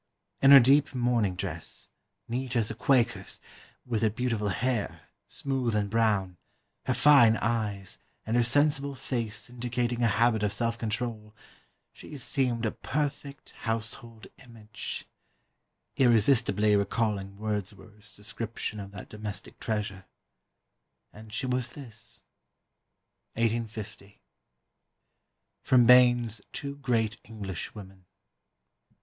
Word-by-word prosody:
In 135 - +6
her 140 -1 +12
deep 135 +3 +4
mourning 120 -6 +1
dress 85 -3 -6 0.4
(neat 125 +1 -3
as 115 -3 +1
a - - -3
Quaker's), 115 -4 +1 0.5
with 115 -4 -1
her 110 - +3
beautiful 115 -2 -1
hair, 115 +1 -1 0.3
smooth 130 -5 -2
and 100 -1 0
brown, 105 -5 +1 0.5
her - - +1
fine 130 -7 +6
eyes, 105 -4 -2 0.3
and 110 - -1
her 120 - +5
sensible 140 +3 +2
face 115 -5 -3
indicating 120 0 -2
a 115 - +4
habit 115 0 +2
of 105 -1 +1
self 115 +3 -1
control, 110 -1 -4 0.6
she 150 - -10
seemed 125 -2 0
a 110 - +1
perfect 145 -1 -4
household 115 -1 -4 0.2
image 115 -4 -7 0.9
irresistibly 115 -4 +4
recalling 100 -1 -1
Wordsworth's 105 0 -6
description 105 0 -5
of 100 -1 -7
that 100 - -9
domestic 105 -2 -8
treasure. 105 -4 -3 1.1
And 110 0 -13
she 115 - -2
was 125 -1 -1
this." 115 -7 -8 1.1
1850. 110 -3 -3 1.4
[Sidenote: 125 -2 +5
Bayne's 120 -3 +5
Two 140 0 -5
great 115 -5 0
Englishwomen. 95 -2 -7
115 Hz, 110 wpm, -28 LUFS, 105-125 Hz, 1.4 s, her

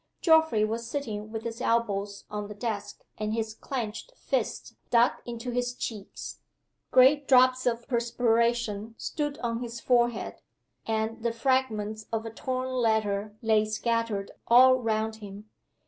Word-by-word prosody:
Geoffrey 320 -10 +4
was 230 +2 -4
sitting 215 -6 -4
with 220 0 -5
his 230 0 -5
elbows 205 -3 0
on 210 -1 -5
the 210 - -8
desk, 205 -2 -4 0.2
and 215 0 -1
his 220 -1 -2
clenched 235 - -5
fists - - -2 0.2
dug 235 +1 +5 0.2
into 240 +1 -5
his 245 0 -1
cheeks. 210 -6 -6 0.5
Great 270 +2 +5
drops 255 -1 +5
of 235 0 -1
perspiration 235 -2 0
stood 295 -2 -3
on 230 0 -1
his 235 -1 -5
forehead, 240 -3 +1 0.5
and 220 +1 -1
the 235 0 0
fragments 225 -4 0
of 225 0 -2
a 225 - -5
torn 255 +3 -3
letter 215 -4 0
lay 220 -1 +4
scattered 215 -2 -1 0.2
all 255 +2 +7
round 220 -1 -1
him. 210 0 -11
230 Hz, 140 wpm, -28 LUFS, 215-245 Hz, 0.5 s, all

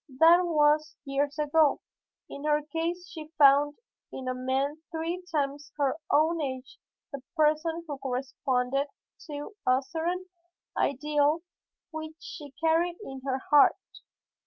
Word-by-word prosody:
That 340 +4 +7
was 305 -1 +3
years 285 +1 -1
ago. 300 0 +3 0.5
In 280 - -9
her 300 0 +2
case 330 +4 -3
she 320 -5 -9
found 285 0 +6 0.4
in 260 -1 -6
a 255 - 0
man 265 +4 -1
three 335 +2 -3
times 290 -1 -2
her 280 -3 +1
own 320 +3 +3
age 260 -2 -5 0.3
the 280 - -5 0.2
person 310 +2 +2
who 290 -4 -6
corresponded 265 +1 -1 0.4
to 295 +7 -7
a 255 +2 +4
certain 335 +6 -3 0.5
ideal 295 +3 +1 0.5
which 315 0 -6
she 295 -2 -9
carried 335 +2 +2
in 270 -5 -8
her 265 -1 0
heart. 290 -1 +7
295 Hz, 130 wpm, -28 LUFS, 275-320 Hz, 0.5 s, That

